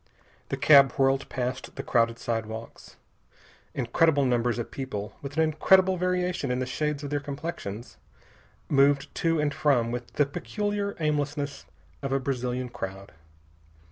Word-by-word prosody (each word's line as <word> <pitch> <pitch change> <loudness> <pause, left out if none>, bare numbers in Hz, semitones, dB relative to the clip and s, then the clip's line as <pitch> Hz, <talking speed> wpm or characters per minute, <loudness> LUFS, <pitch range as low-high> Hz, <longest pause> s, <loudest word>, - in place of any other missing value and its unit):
The - - -2
cab 140 -4 +7
whirled 135 0 +1
past 125 0 -4
the - - -5
crowded 115 -1 +2
sidewalks. 115 -1 -5 0.8
Incredible 140 +3 +2
numbers 120 -2 +1
of 120 - -4
people, 105 -7 -5
with 145 +2 -7
an 160 - +5
incredible 185 +4 +4
variation 180 -4 -1
in 125 - 0
the 130 - -1
shades 150 +3 -2
of 145 - -5
their 145 - +1
complexions, 140 -7 -6 0.7
moved 140 0 +3
to 165 -1 +1
and 150 -1 +1
from 125 -5 +2
with 120 0 -5
the 145 - +3
peculiar 205 +7 -3
aimlessness 145 - -2 0.3
of 135 - -3
a 135 - +2
Brazilian 125 -1 -2
crowd. 95 -3 -7
140 Hz, 140 wpm, -27 LUFS, 120-150 Hz, 0.8 s, cab